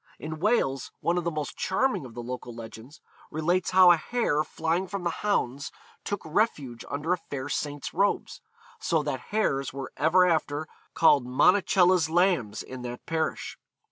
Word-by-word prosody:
In 155 0 -6
Wales, 160 - +1
one 175 +1 +1
of 175 - -6
the - - +2
most 155 -3 -4
charming 220 - 0
of 115 - -15
the 120 - -6
local 125 -1 -6
legends 115 +4 -11 0.3
relates 175 +4 0
how 185 -1 +7
a 175 - +5
hare 155 -6 0
flying 165 +4 -1
from 195 0 -5
the 170 - 0
hounds 140 -10 -1 0.3
took 205 - -3
refuge 150 - -1
under 150 +5 -1
a - - 0
fair 140 -4 -6
saint's 145 -3 -3
robes, 200 +4 0 0.4
so 160 -3 0
that 145 -3 -2
hares 140 - 0
were 135 -1 -6
ever 180 +3 +4
after 155 -3 0 0.3
called 145 -6 +4
Monacella's 180 +3 +4
Lambs 175 - +1
in 130 -1 -8
that 125 0 -7
parish. 160 -1 -3
160 Hz, 165 wpm, -27 LUFS, 135-180 Hz, 0.4 s, how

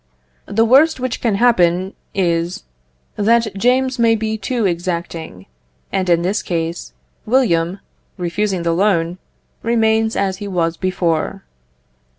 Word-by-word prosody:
The 225 +2 +2
worst 275 +6 +5
which 255 -1 -3
can 225 -4 +1
happen 190 -5 +2 0.2
is, 170 -2 0 0.5
that 225 0 +2
James 255 +4 +1
may 230 -1 +4
be 220 0 -2
too 220 +2 -2
exacting; 170 - -3 0.5
and 190 -2 -1
in 170 0 +3
this 195 +4 0
case, 165 -1 -4 0.3
William, 190 -7 +2 0.4
refusing 185 +1 -1
the 170 0 +1
loan, 175 -2 +1 0.4
remains 225 -1 +1
as 190 -1 0
he 205 +1 -6
was 170 -3 0
before. 175 -4 -1
195 Hz, 125 wpm, -18 LUFS, 170-225 Hz, 0.5 s, worst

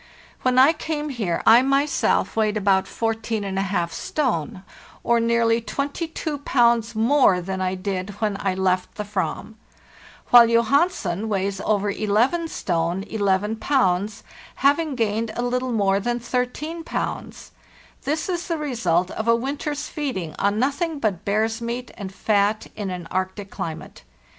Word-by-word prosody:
When 255 0 +1
I 270 +5 +7
came 305 -1 -3
here 215 -11 -2
I 230 +2 +8
myself 275 +2 +1
weighed 215 -1 +1
about 195 -2 +2
144 200 -5 -1
stone, 185 - -2 0.4
or 235 0 +3
nearly 230 0 +2
22 290 +4 -3
pounds 235 -4 +2
more 230 -4 +4
than 190 +1 -4
I 185 0 0
did 185 0 -3
when 210 -2 0
I 190 -2 -1
left 185 -1 0
the 210 - -3
Ava; 210 +1 -3 0.8
while 240 -1 +9
Johansen 230 - +1
weighs 195 -1 -1
over 205 -1 +1
11 230 - +1
stone 175 - -1
11 205 +1 0
pounds, 205 -7 +1 0.3
having 290 +1 +2
gained 225 -1 -1
a 240 - -2
little 250 +1 -1
more 200 -3 +2
than 240 +4 -1
13 250 +7 -3
pounds. - - -5 0.5
This 305 +2 -2
is 350 -2 -3
the 335 -2 -1
result 190 - 0
of 220 - -4
a 230 - +5
winter's 290 +4 -3
feeding 190 - -4
on 200 +1 +1
nothing 285 +6 0
but 210 -10 -1
bear's 220 +3 0
meat 240 +1 -4
and 195 -3 -7
fat 205 +1 +1
in 205 -2 -4
an 180 -2 -6
Arctic 190 +2 -3
climate. 160 -1 -6
225 Hz, 145 wpm, -23 LUFS, 195-260 Hz, 0.8 s, while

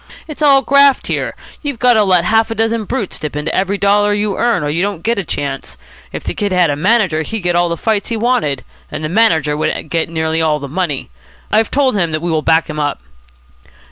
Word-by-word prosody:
"It's 305 -1 -8
all 275 -2 +5
graft 280 +2 +4
here. - - -2 0.3
You've 285 -4 -4
got 250 0 +4
to 215 -2 +4
let 180 -3 +3
half 225 +2 +2
a 225 - -3
dozen 225 0 0
brutes 220 -4 -4
dip 150 -2 -5
into 150 +2 -3
every 195 +1 0
dollar 205 +1 +2
you 205 -1 -1
earn, 235 -9 +1
or 145 - -1
you 160 +4 -1
don't 195 -4 -2
get 230 -1 0
a - - -2
chance. 135 - -5 0.3
If - - -6
the - - -3
kid 205 -1 -2
had 180 -4 +3
a - - -1
manager, 185 -1 +2
he'd 220 +6 -4
get 175 -1 0
all 175 0 +2
the 170 - -2
fights 215 +3 -1
he 230 - -2
wanted. 220 - 0 0.3
And - - -5
the 155 - -2
manager 165 -7 +2
would 155 0 -3
get 165 -1 0
nearly 160 0 -1
all 155 -2 +2
the 140 -1 -7
money. 150 -2 -3 0.4
I've 220 +1 +2
told 265 -4 +1
him 175 -5 +1
that 155 - 0
we 175 - -1
will 160 -1 +1
back 160 +1 +2
him 150 -1 -5
up." 145 -1 -1
185 Hz, 235 wpm, -16 LUFS, 160-225 Hz, 0.4 s, all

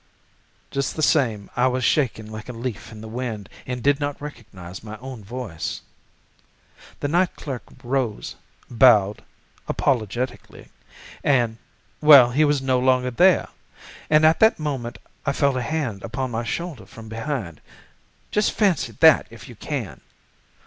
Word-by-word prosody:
"Just 140 -1 -2
the 155 - -2
same, 115 -10 +1
I 125 +1 +3
was 130 0 -1
shaking 120 -7 +1
like 110 +2 -8
a - - -5
leaf 115 -2 -6
in 110 -1 -10
the 110 - -8
wind 110 -3 -5 0.2
and 125 -2 -4
did 145 0 +3
not 145 -1 -3
recognize 100 -11 -10
my 110 0 -8
own 125 -2 -9
voice. 110 -6 -5 1.2
"The - - 0
night 175 +4 +1
clerk 135 -5 -6 0.2
rose, 125 -3 -2 0.3
bowed 110 -5 +4 0.4
(apologetically) 120 0 -2 0.5
and—well, 125 +2 +4
he 145 +5 +3
was 145 -2 +2
no 130 -1 +2
longer 125 0 +2
there, 180 +9 +4 0.6
and 155 0 +5
at 160 +1 +5
that 220 +1 +5
moment 135 -6 -4 0.3
I 140 - 0
felt 140 -2 +2
a 130 - -1
hand 130 -4 -2
laid - - -9
upon 130 +1 -3
my 115 +1 -3
shoulder 150 - -5
from 110 +3 -12
behind. 110 - -4 0.7
Just 210 0 +1
fancy 195 -8 +1
that 160 -3 +7
if 115 -3 -12
you 120 - -11
can! 110 - -5
125 Hz, 150 wpm, -23 LUFS, 110-145 Hz, 1.2 s, that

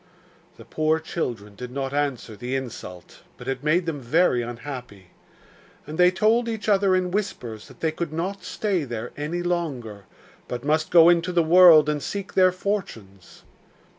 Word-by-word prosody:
The - - -13
poor 155 +1 0
children 120 -10 -5
did 125 +4 -8
not 135 +1 -4
answer 140 -6 -2
the 125 +4 -4
insult; 110 -9 -8 0.2
but - - -11
it 135 0 -3
made 170 +4 +2
them 155 -4 -4
very 130 0 +2
unhappy. 120 -6 -8 0.7
And 155 +3 -8
they 180 0 +7
told 220 +5 +2
each 220 -2 -5
other 195 -2 +3
in 185 -1 0
whispers 125 - -4
that - - -17
they 160 - +1
could 160 0 -4
not 180 +5 -4
stay 195 -6 -1
there 120 -3 -6
any 160 +4 -3
longer, 135 - -3 0.4
but 125 +2 -6
must 155 +1 +1
go 165 -1 +7
into 175 0 +3
the 175 -1 +2
world 165 -2 +7
and 150 -1 -1
seek 200 +4 -5
their 185 -1 +5
fortunes. 120 - -5
155 Hz, 165 wpm, -24 LUFS, 125-180 Hz, 0.7 s, they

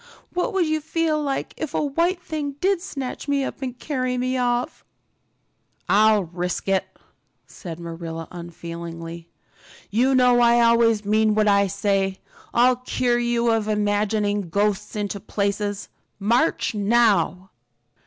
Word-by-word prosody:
"What 360 +7 0
would 380 -3 +2
you 310 0 0
feel 315 0 0
like 275 -2 -3
if 315 -3 -4
a - - +1
white 335 +6 0
thing 305 -4 -4
did 370 +5 0
snatch 275 -7 -6
me 280 -1 +1
up 270 - -5
and 255 -2 -4
carry 255 -4 -2
me 255 +1 -1
off?" 245 -1 -1 1.0
"I'll 210 +2 +4
risk 175 +2 -4
it," 195 -1 +2 0.6
said 170 -4 -9
Marilla 165 -1 -6
unfeelingly. 170 -1 -8 0.6
"You 255 +6 +3
know 250 -1 +5
I 235 0 +5
always 230 -2 +4
mean 215 +1 +2
what 215 0 +2
I 200 -1 +4
say. 195 -1 0 0.3
I'll 250 +1 +4
cure 250 -1 0
you 240 -1 +1
of 220 -2 0
imagining 205 -2 0
ghosts 205 +3 0
into 205 -1 -3
places. 205 0 -2 0.3
March, 235 +10 +1
now." 200 -4 +2
220 Hz, 135 wpm, -23 LUFS, 195-255 Hz, 1.0 s, know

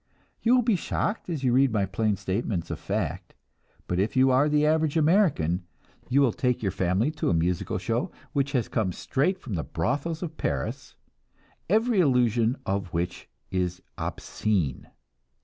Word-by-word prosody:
You 235 +2 +4
will 250 - +4
be 225 -3 +3
shocked 200 +3 -2
as 155 -6 -3
you 125 -2 +3
read 135 0 +4
my 105 -3 +1
plain 105 +2 0
statements 95 -2 -2
of - - -4
fact, - - -3 0.5
but 90 - -1
if 100 +7 0
you 130 0 +5
are 135 +4 +4
the 150 0 +3
average 155 0 +2
American, 150 - +3 0.5
you 135 +3 +4
will 125 -5 +3
take 125 -3 0
your 100 - +1
family 95 - +1
to 155 - -1
a 90 - +2
musical 85 +2 0
show - - -1 0.2
which 140 -1 0
has 125 -4 +1
come 95 -6 -1
straight 150 - 0
from 125 - -7
the 80 - -1
brothels 145 - -2
of 160 -2 -6
Paris, 65 -3 -3 0.7
every 220 +2 +3
allusion 125 -4 +2
of 95 -1 -2
which 85 +1 -3 0.2
is 90 -1 -2
obscene. 90 -12 -2
125 Hz, 165 wpm, -26 LUFS, 95-150 Hz, 0.7 s, you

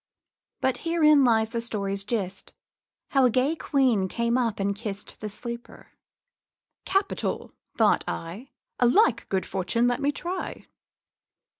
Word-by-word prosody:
But 260 - +1
herein 305 -4 +4
lies 225 -3 +3
the 230 -1 -2
story's 200 -4 -3
gist, 195 -3 -3 0.6
How 270 -2 +4
a - - +5
gay 260 +6 +1
queen 255 -11 +2
came 235 +4 0
up 235 -5 0
and 200 0 0
kist 205 -1 -6
The 215 - -5
sleeper. 235 +3 -8 1.0
'Capital!' 390 +1 -1 0.2
thought - - +4
I. 190 +11 -5 0.3
'A 245 - +5
like 420 - +3
good 190 -2 0
fortune 195 +5 0
let 245 +2 0
me 285 +1 +2
try.' 355 +5 -5
235 Hz, 135 wpm, -26 LUFS, 200-275 Hz, 1.0 s, a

